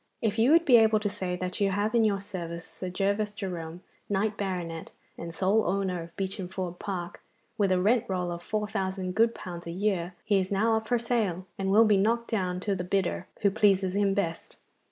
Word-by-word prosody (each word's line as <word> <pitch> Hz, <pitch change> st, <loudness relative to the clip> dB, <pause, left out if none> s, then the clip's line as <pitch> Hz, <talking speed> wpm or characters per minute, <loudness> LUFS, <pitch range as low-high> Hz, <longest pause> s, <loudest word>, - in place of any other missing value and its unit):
If 220 Hz, -1 st, -1 dB
you 230 Hz, +4 st, +5 dB
would 335 Hz, +2 st, +5 dB
be 250 Hz, -3 st, +7 dB
able 220 Hz, -1 st, +5 dB
to 210 Hz, -1 st, -1 dB
say 185 Hz, -2 st, -3 dB
that 180 Hz, +2 st, -4 dB
you 200 Hz, -, +4 dB
have 205 Hz, +3 st, 0 dB
in 235 Hz, -1 st, +4 dB
your 205 Hz, -2 st, +2 dB
service 170 Hz, -4 st, -6 dB
Sir 185 Hz, -, -7 dB
Gervas 200 Hz, +3 st, -1 dB
Jerome, 175 Hz, -3 st, -5 dB, 0.3 s
knight 205 Hz, +1 st, 0 dB
banneret, 180 Hz, -5 st, -4 dB, 0.3 s
and 170 Hz, 0 st, -6 dB
sole 195 Hz, +6 st, +2 dB
owner 185 Hz, -1 st, 0 dB
of 165 Hz, 0 st, -11 dB
Beacham 190 Hz, -1 st, -3 dB
Ford 180 Hz, -1 st, -5 dB
Park, 180 Hz, -4 st, -5 dB, 0.3 s
with 200 Hz, -4 st, +1 dB
a 185 Hz, -, +3 dB
rent 215 Hz, +5 st, +3 dB
roll 180 Hz, -2 st, -2 dB
of 170 Hz, 0 st, -5 dB
four 210 Hz, +3 st, -2 dB
thousand 190 Hz, -2 st, -2 dB
good 230 Hz, +3 st, +3 dB
pounds 175 Hz, -1 st, -7 dB
a -, -, -3 dB
year, 185 Hz, -1 st, -1 dB
he 205 Hz, -2 st, +3 dB
is 185 Hz, +1 st, -3 dB
now 220 Hz, +3 st, +2 dB
up 220 Hz, 0 st, -2 dB
for 245 Hz, -, +2 dB
sale, 220 Hz, -7 st, -1 dB
and 195 Hz, 0 st, -2 dB
will 215 Hz, +4 st, +6 dB
be 210 Hz, -2 st, +4 dB
knocked 230 Hz, +4 st, +1 dB
down 180 Hz, -4 st, -1 dB
to 200 Hz, 0 st, 0 dB
the 180 Hz, -, -3 dB
bidder 185 Hz, 0 st, -1 dB
who 200 Hz, -, +4 dB
pleases 195 Hz, -2 st, +3 dB
him 200 Hz, -1 st, +2 dB
best. 170 Hz, -5 st, -3 dB
195 Hz, 215 wpm, -28 LUFS, 180-215 Hz, 0.3 s, be